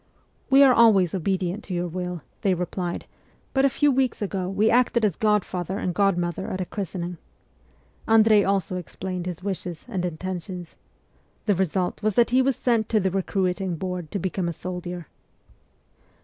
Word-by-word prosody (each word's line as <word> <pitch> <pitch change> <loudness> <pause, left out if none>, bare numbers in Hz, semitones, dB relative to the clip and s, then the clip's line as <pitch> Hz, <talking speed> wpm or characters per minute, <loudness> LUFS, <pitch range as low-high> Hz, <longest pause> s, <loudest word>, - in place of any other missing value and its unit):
' - - -39
We 270 +1 +7
are 265 -2 +7
always 205 -8 +5
obedient 190 +2 -1
to 185 - -4
your 175 0 -1
will,' 180 -2 -4 0.2
they 190 -2 +2
replied, 175 0 -3 0.2
' - - -36
but 270 0 +3
a - - +5
few 290 +3 +2
weeks 260 -2 +1
ago 190 -3 -2
we 210 +3 +2
acted 235 -2 +3
as 195 -6 +1
godfather 195 -4 0
and 180 -3 -2
god 195 -1 +2
mother 175 +2 -2
at 190 -4 -3
a 185 - -1
christening.' 180 -3 -5 0.9
Andrei 220 -2 +6
also 190 -2 0
explained 180 +1 -5
his 180 0 -5
wishes 180 -4 -4
and 185 -2 -3
intentions. 180 0 -5 0.7
The 210 - +3
result 185 0 -1
was 215 -2 0
that 240 0 +4
he 255 +1 +5
was 265 0 +2
sent 230 -3 +1
to 220 - +3
the 190 -1 0
recruiting 190 -1 -1
board 180 -1 -4
to - - -3
become 185 -1 -2
a - - -3
soldier. 180 0 -6
190 Hz, 175 wpm, -25 LUFS, 180-215 Hz, 0.9 s, We